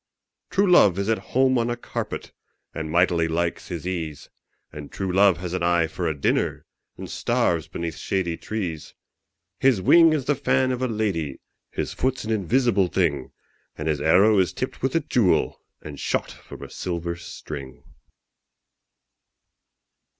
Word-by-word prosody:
True 200 +1 +2
love 105 - +6
is 100 +2 -1
at 115 - +2 0.2
home 130 -1 +4
on 115 0 0
a 120 - -2
carpet, - - -5 0.4
And 80 -1 -4
mightily 85 0 +2
likes 85 +1 -2
his 85 -2 -6
ease 80 -6 -5 0.4
And 75 -1 -9
true 95 -2 -3
love 95 -2 +5
has 90 0 -5
an 90 - -2
eye 85 -1 +3
for 80 - -3
a 80 - -2
dinner, - - 0 0.3
And - - -7
starves 85 -3 0
beneath 85 -1 -5
shady 90 -4 -1
trees. 85 -7 -5 0.6
His 130 -6 +4
wing 165 - +6
is 150 -5 0
the 145 - +2
fan 130 -2 +1
of 125 0 -3
a 130 - +1
lady, 95 - -2 0.3
His - - -4
foot's 130 0 -1
an 110 - -3
invisible 110 -1 +2
thing, 80 -8 0 0.5
And 75 - -4
his 75 -2 0
arrow 100 +7 +5
is 90 -3 +1
tipped - - -5
with - - -1
a - - +3
jewel, - - +1 0.2
And 75 -2 -8
shot - - -1
from - - -12
a - - -8
silver 85 -1 -3
string. 70 -5 -9
90 Hz, 160 wpm, -24 LUFS, 80-110 Hz, 0.6 s, love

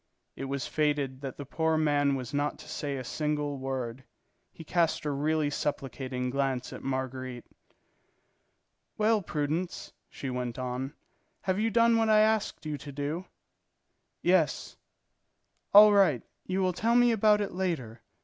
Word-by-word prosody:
It 135 - -5
was 135 0 -3
fated 145 -3 0
that 135 -2 -6
the 145 - -6
poor 160 +3 0
man 145 -2 +2
was 125 -1 -5
not 145 +1 0
to - - -13
say 140 -2 -3
a 130 - -5
single 150 +1 -2
word. 130 -2 -4 0.5
He 165 - -11
cast 165 0 +1
a 150 - 0
really 150 +1 0
supplicating 130 -3 -3
glance 135 -2 -1
at - - -8
Marguerite. 130 -2 -4 1.5
"Well, 215 0 +3
Prudence," 155 +2 -3 0.2
she 135 - -5
went 125 -2 -3
on, 130 +3 -4 0.5
"have 185 +1 0
you 225 +1 +2
done 230 +1 +4
what 225 -1 +2
I 215 0 +6
asked 215 -5 +1
you 150 -2 -3
to 145 - -8
do?" 145 +6 -3 1.0
"Yes. 175 -3 +2 1.0
"All 210 +1 +9
right. 185 - +4 0.2
You 190 +1 0
will 185 -1 +1
tell 230 +6 +1
me 245 0 +6
about 215 -1 +4
it 205 -2 -2
later. 155 -12 -3
150 Hz, 150 wpm, -29 LUFS, 135-185 Hz, 1.5 s, All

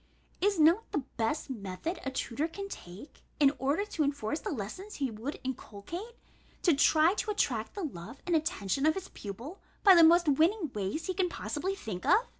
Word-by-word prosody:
Is 400 0 +3
not 335 +8 +4
the 295 - -1
best 230 +7 0
method 205 - -4
a 270 - -1
tutor 265 +2 -2
can 395 +4 -6
take, 190 - -10 0.2
in 280 -2 +6
order 285 +10 +1
to 335 -7 -1
enforce 285 0 -1
the - - -4
lessons 300 - -5
he 270 -4 -1
would 225 +7 -5
inculcate, 265 - -6 0.5
to 345 - +5
try 315 +4 +5
to 425 - -3
attract 240 - 0
the 400 - -4
love 230 - -7
and 350 -2 +1
attention 295 - 0
of 315 - +3
his 385 -1 -6
pupil 235 - -8 0.2
by 390 - +9
the 340 -2 +8
most 340 +1 +6
winning 320 +3 +3
ways 205 +10 -2
he 370 - -1
can 365 -1 +1
possibly 365 +4 -3
think 195 - -6
of? 445 +6 +4
305 Hz, 190 wpm, -31 LUFS, 235-365 Hz, 0.5 s, by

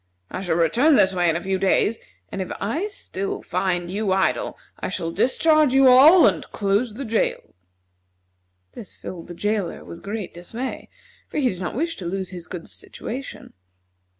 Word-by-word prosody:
I 185 - -4
shall 175 -4 0
return 235 - +4
this 190 -6 +4
way 175 -2 +2
in 165 - +1
a 170 - -3
few 190 0 -1
days, 195 +3 +2 0.3
and 195 - -3
if 185 - -5
I 295 - -1
still 195 - -5
find 175 -1 -1
you 200 0 -1
idle 195 - 0 0.2
I - - -3
shall 165 - -3
discharge 300 - +3
you 270 0 +6
all 285 +8 +8
and - - +2
close 205 +3 0
the 275 +3 -5
jail." 225 -1 -1 1.2
This 205 - -10
filled 170 -3 -8
the 175 - -8
jailer 205 0 -2
with 170 - -10
great 205 -1 -5
dismay, 225 +9 -6 0.4
for - - -5
he 270 -4 +3
did 185 - -5
not 185 - -4
wish 330 +5 -1
to 185 - -7
lose 190 +1 -3
his 175 -2 -9
good 175 -2 -7
situation. 260 +4 -8
200 Hz, 180 wpm, -23 LUFS, 180-255 Hz, 1.2 s, all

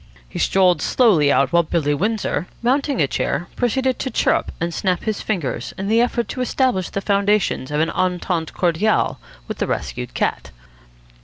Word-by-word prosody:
He - - -7
strolled 185 -2 +3
slowly 180 - +3
out, 140 +5 +2
while 170 - +6
Billy 155 -3 0
Windsor, 195 -2 -1 0.2
mounting 275 +2 +1
a 145 - +4
chair, 155 +4 -2
proceeded 260 +1 0
to 265 - -2
chirrup 225 - +1
and 170 +1 -2
snap 180 -1 -1
his 215 -2 -2
fingers 150 - -3
in 195 +1 -3
the 225 +2 +4
effort 240 -1 0
to 255 - -4
establish 250 -7 0
the 200 - -3
foundations 200 -7 +1
of 150 +1 0
an 165 - 0
entente 180 -2 -1
cordiale 180 - +1 0.3
with - - -6
the - - 0
rescued 60 -2 -4
cat. - - -1
190 Hz, 170 wpm, -20 LUFS, 160-225 Hz, 0.3 s, while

